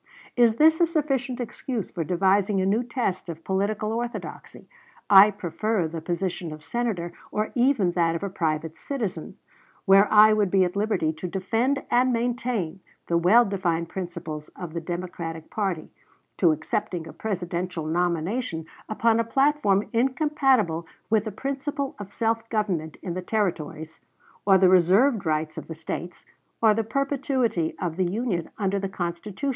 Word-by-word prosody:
Is 235 -3 +4
this 315 +5 +5
a 340 - +5
sufficient 275 -6 -1
excuse 240 -2 -4
for 170 - -3
devising 195 +3 +2
a 190 - +1
new 205 +5 +2
test 235 -8 -2
of 165 0 -7
political 210 +3 -1
orthodoxy?... 240 +1 -6 0.4
I 200 +1 +10
prefer 200 0 -1
the 160 0 -6
position 175 0 -3
of 155 0 -9
Senator 200 -6 -2 0.2
or 215 +1 -1
even 245 -7 +2
that 170 -1 +1
of 170 - -4
a 200 - -2
private 160 -2 -2
citizen, 235 -10 -4 0.5
where 195 +1 +6
I 215 0 +8
would 210 -3 +2
be 190 0 +4
at 180 +1 -2
liberty 200 -6 0
to 160 +3 -6
defend 225 +9 0
and 250 +1 +4
maintain 235 -7 -1 0.3
the 170 - +1
well 215 +8 +6
defined 175 -5 -1
principles 170 -5 -6
of 175 -3 -7
the 170 - -3
Democratic 170 -2 -5
party, 190 -7 -2 0.5
to 170 -4 +4
accepting 165 +2 -2
a - - -10
Presidential 180 -4 -3
nomination 175 +3 -1 0.2
upon 225 +1 +2
a - - +3
platform 230 -5 +2
incompatible 260 - +2 0.2
with 220 -1 +3
the 215 - -3
principle 275 +4 -3
of 200 -1 -8
self 225 +1 -1
government 185 -8 -2
in 175 - -3
the 185 - -3
Territories, 160 -6 -3 0.5
or 195 -1 +7
the 190 0 +5
reserved 190 +5 +4
rights 155 0 -1
of - - -11
the 160 - -6
States, 170 +2 -6 0.3
or 220 -2 +5
the 225 +1 0
perpetuity 260 - -1
of 175 -3 -3
the 180 -2 +1
Union 205 -6 -2
under 200 -1 0
the 195 0 -3
Constitution." 190 +8 -4
195 Hz, 160 wpm, -25 LUFS, 170-230 Hz, 0.5 s, I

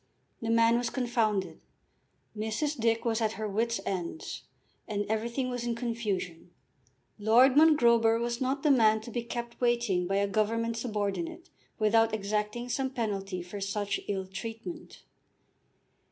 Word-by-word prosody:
The 225 - -3
man 230 +1 +4
was 245 - -1
confounded, 215 -9 -1 0.7
Mrs. 220 +8 -1
Dick 230 -1 +1
was 230 0 +1
at 220 -1 +1
her 215 +2 -4
wits' 230 +2 0
ends, 185 - -4 0.5
and 205 -1 -2
everything 235 +4 -1
was 245 -1 -3
in 240 -1 -1
confusion. 210 -8 -3 0.7
Lord 240 +5 +5
Mongrober 235 -7 +5
was 235 +1 -2
not 270 +2 -1
the 300 - +5
man 220 -4 +5
to 235 - -9
be 240 - -2
kept 235 0 -6
waiting 235 -7 +1
by 195 - 0
a 200 0 +2
government 225 +3 0
subordinate 205 - -3 0.3
without 225 +1 +3
exacting 210 +3 -2
some 265 +2 -1
penalty 200 -7 -3
for 195 +3 -8
such 200 0 -1
ill 190 -2 -2
treatment. 225 - -8
225 Hz, 140 wpm, -29 LUFS, 205-240 Hz, 0.7 s, Lord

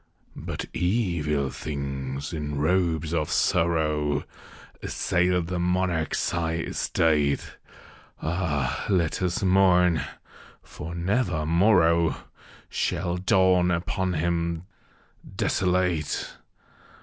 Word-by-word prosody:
But - - -4
evil 85 - 0
things, 70 0 -5
in 75 -2 -3
robes 80 0 +1
of 75 -2 0
sorrow, 75 -3 +1 0.6
Assailed 90 0 0
the 90 +1 -3
monarch's 90 -2 0
high 80 -1 -1
estate. 75 -3 0 0.6
(Ah, 80 -6 -1
let 90 -5 +1
us 90 +1 -1
mourn! 90 -4 +4 0.6
for 85 +2 -8
never 90 -3 0
morrow 85 -1 +4 0.5
Shall 90 0 -1
dawn 95 -2 +3
upon 90 +2 -1
him 85 0 -1 0.7
desolate 90 -4 0
85 Hz, 85 wpm, -26 LUFS, 75-90 Hz, 0.7 s, mourn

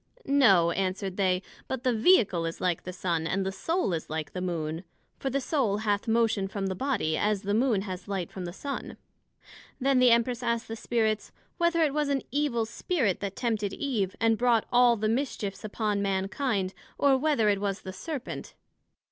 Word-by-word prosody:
No, 195 -12 +5
answered 190 +1 -2
they; 185 -1 +1 0.2
but 265 -2 -4
the 255 - +2
Vehicle 215 - +4
is 165 - -5
like 180 -2 -1
the 185 - -4
Sun, 170 -3 -1
and 190 +2 0
the 190 - -1
Soul 195 - -1
like 155 -1 -4
the 180 - -4
Moon; 165 -2 -3 0.4
for 270 - -2
the 275 +1 0
Soul 255 -7 0
hath 210 +1 -1
motion 225 -3 +2
from 195 0 -4
the 190 - -1
Body, 215 - 0
as 205 +3 0
the 200 +1 -1
Moon 225 -3 +2
has 185 -2 -6
light 190 -4 -3
from 185 -2 -6
the 175 - -5
Sun. 275 +9 -6 0.8
Then 270 0 +3
the 250 -1 +6
Empress 235 +1 +2
asked 235 0 -1
the 225 - -5
Spirits, 220 -1 -1 0.3
Whether 340 -1 +3
it 295 -3 +1
was 300 -1 0
an 275 -1 0
evil 280 -6 +1
Spirit 230 - -1
that 200 -1 -4
tempted 215 -5 -1
Eve, 220 -10 -1
and 225 -1 +2
brought 240 -3 +3
all 245 -1 +5
the 215 +1 0
mischiefs 225 -5 -2
upon 210 -1 -1
Mankind: 195 +1 -1 0.2
or, 280 -1 +4
Whether 265 -6 +2
it 200 -1 +1
was 200 -1 -2
the 190 - -6
Serpent? 290 - -6
215 Hz, 190 wpm, -28 LUFS, 190-255 Hz, 0.8 s, the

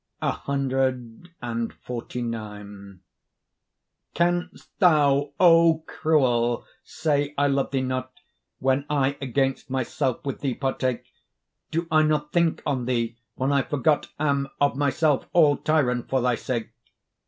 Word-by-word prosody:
CXLIX 130 0 -2 2.9
Canst 175 +1 -1
thou, 145 -6 +4
O 165 -2 +5
cruel! 120 -6 +1 0.2
say 145 -2 -1
I 145 - +3
love 140 -1 +1
thee 135 -1 0
not, 130 0 -3 0.5
When 135 +1 +1
I 140 -1 +1
against 135 0 -1
myself 130 0 -2
with 135 - -3
thee 135 -4 -2
partake? 130 -2 -2 0.6
Do 165 +1 -2
I 155 0 +5
not 150 -1 0
think 170 -2 +1
on 130 -4 -1
thee, 120 -2 -1 0.2
when 130 +2 0
I 140 -1 +3
forgot 145 +2 +1
Am 140 -2 0
of 145 -1 +2
my 145 0 +1
self, 145 +1 +1
all 155 -4 +5
tyrant, 125 -6 0
for 135 - +2
thy 125 0 +2
sake? 120 -1 -3
140 Hz, 120 wpm, -25 LUFS, 130-155 Hz, 2.9 s, O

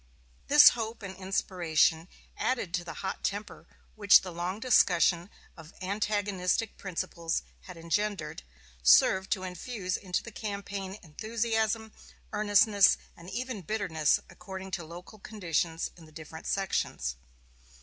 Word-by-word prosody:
This 290 0 +9
hope 225 -1 -5
and 190 -1 -6
inspiration, 175 -3 +1 0.3
added 240 -9 -1
to 180 -2 0
the 175 - -7
hot 190 - -4
temper 205 +1 -4 0.3
which 205 -2 +6
the 185 - -7
long 175 +4 -3
discussion 180 -7 +3 0.3
of 160 0 -14
antagonistic 200 0 -1
principles 170 - -3 0.2
had - - -10
engendered, 195 - -2 0.4
served 190 - +5
to 190 -3 -5
infuse 185 +1 -4
into 180 -2 -2
the 230 - -9
campaign 200 -2 -5
enthusiasm, 220 +4 -1 0.4
earnestness, 205 -1 +5 0.2
and 170 +1 -12
even 250 -3 -4
bitterness, 170 -6 +1
according 190 +1 -9
to 175 - -3
local 175 +6 -11
conditions 170 -5 -2
in 165 -3 -15
the - - -17
different 160 +1 -10
sections. 190 - -1
190 Hz, 125 wpm, -29 LUFS, 170-210 Hz, 0.4 s, This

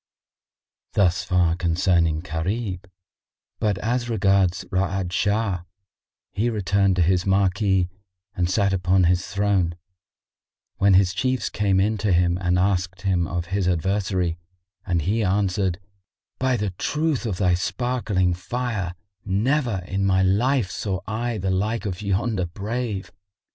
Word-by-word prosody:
Thus 90 -3 +2
far 85 -2 +2
concerning 85 -2 +1
Gharib; 90 +2 -3 0.7
but 105 -3 +1
as 120 +3 -1
regards 95 -3 +2
Ra'ad 95 -1 -1
Shah, 100 0 +1 0.7
he 110 +5 0
returned 100 -3 +1
to 90 - +3
his 90 +2 +1
marquee 95 -1 +2 0.5
and 90 -3 0
sat 100 0 +2
upon 95 0 +2
his 90 +1 +2
throne, 100 -4 +1 1.0
when 100 -1 +4
his 90 -1 +4
Chiefs 130 +6 -1
came 100 -2 +1
in 105 +2 +1
to 105 -1 0
him 85 0 +2
and 90 -1 +2
asked 95 0 0
him 90 -4 +1
of 85 0 -3
his 100 -2 +1
adversary, 90 -1 0 0.5
and 85 -3 +1
he 110 +6 +1
answered, 95 -2 0 0.6
"By 130 -1 +1
the 105 -3 -2
truth 150 - -1
of 95 -5 -2
the 90 -2 +2
sparkling 95 0 0
Fire, 100 0 -3 0.3
never 110 +1 0
in 100 0 -1
my 95 -1 +3
life 105 +2 +2
saw 95 -3 -3
I 115 +1 -2
the 95 -1 -1
like 110 +5 -1
of 95 -1 -4
yonder 100 -1 0
brave! 105 +2 -4
95 Hz, 135 wpm, -23 LUFS, 90-105 Hz, 1.0 s, when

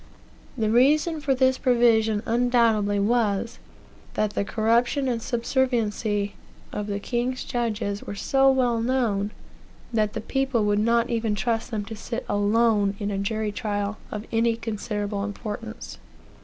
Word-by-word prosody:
The 215 -2 +1
reason 300 +6 +3
for 280 -3 +1
this 260 0 +2
provision 225 -3 +3
undoubtedly 230 -4 +2
was, 220 0 0 0.6
that 215 -1 +1
the - - 0
corruption 235 +6 +1
and 235 -2 -1
subserviency 230 -5 0 0.4
of 210 0 -3
the 200 -1 -2
king's 245 +4 -2
judges 215 -4 -2
were 205 - -6
so 270 +7 +3
well 245 -3 +2
known, 230 -5 0 0.6
that 215 -2 +1
the - - -4
people 265 -2 0
would 205 0 +2
not 230 +2 +2
even 225 -2 0
trust 225 +3 -1
them 215 -4 -3
to 220 - -7
sit 230 +2 -5
alone 205 -1 +2
in 205 -1 -3
a 195 - -2
jury 215 +1 -1
trial 205 -2 -3
of 210 +1 -5
any 230 0 +2
considerable 210 -2 -3
importance. 215 +2 -6
225 Hz, 140 wpm, -25 LUFS, 205-240 Hz, 0.6 s, reason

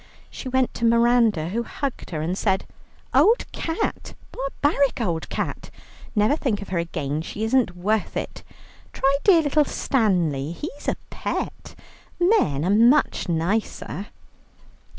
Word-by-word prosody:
She 260 - -6
went 260 0 +1
to - - -6
Miranda, 230 -7 +3
who 225 +6 -1
hugged 270 +3 -5
her, 155 -3 -3
and 175 +3 -1
said: 190 -1 0 0.5
"Old 460 +3 +4
cat! 325 0 -3 0.2
barbaric 280 0 0
old 170 -8 -2
cat! - - -4 0.5
Never 210 +6 +3
think 255 -9 -1
of 200 - -8
her 180 -2 0
again, 155 -3 -3
she 205 +6 -5
isn't 225 -5 +2
worth 210 +4 -1
it. - - -5 0.5
Try 275 +1 +2
dear 345 -5 +6
little 295 +1 +3
Stanley, 175 - 0
he's 290 - -8
a - - +1 0.2
pet; - - -4 0.4
men 345 - +2
are 185 - +2
much 240 -1 +3
nicer." 190 +3 -2
220 Hz, 135 wpm, -23 LUFS, 175-270 Hz, 0.5 s, dear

